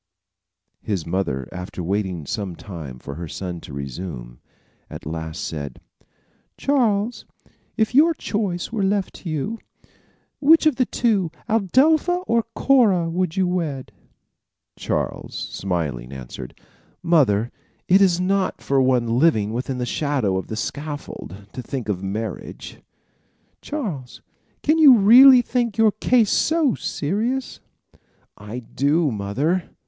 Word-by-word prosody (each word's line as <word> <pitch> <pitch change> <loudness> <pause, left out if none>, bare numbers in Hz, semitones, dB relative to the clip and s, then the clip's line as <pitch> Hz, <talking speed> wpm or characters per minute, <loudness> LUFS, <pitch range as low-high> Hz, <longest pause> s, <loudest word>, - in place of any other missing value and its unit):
His 95 -6 -3
mother 85 -8 -2
after 90 0 -6
waiting 95 -3 -2
some 95 +3 -4
time 80 -10 -8
for 70 +3 -8
her 85 +3 -6
son 90 +1 -6
to - - -11
resume, 70 -3 -7 0.5
at - - -9
last 80 0 -5
said: 70 -5 -5 0.8
"Charles, 235 -5 +1 0.5
if 220 +1 +1
your 320 +5 +5
choice 200 -8 -3
were 225 -3 -2
left 195 -1 -1
you, 165 +9 -3 0.8
which 320 +3 +5
of 310 -5 +3
the 255 -3 +2
two, 205 -8 +1 0.2
Adelpha 300 - +3
or 230 -6 +1
Cora, 200 -11 +3
would 180 -1 -1
you 190 - +3
wed?" 155 -10 -3 0.8
Charles, - - -3
smiling, 75 -10 -3
answered: 65 -1 -9 0.4
"Mother, 120 -10 +3 0.4
it 190 +2 +5
is 180 -3 +4
not 190 +1 0
for 135 -1 +1
one 125 -2 +2
living 110 -10 +3
within 125 +2 -3
the 125 - -2
shadow 130 -7 0
of 95 - -3
the 110 - -5
scaffold 145 - -6
to 125 - -5
think 125 -1 -5
of 95 -3 -1
marriage." 100 +1 -6 0.8
"Charles, 180 - -5 0.4
can 310 +2 +3
you 280 -6 +9
really 245 +5 +8
think 240 -3 -1
your 220 -1 +5
case 220 +1 +2
so 315 -6 +2
serious?" 230 - -2 0.8
"I 105 +4 -8
do 145 +5 +1
mother. 130 - -1
145 Hz, 125 wpm, -22 LUFS, -, 0.8 s, you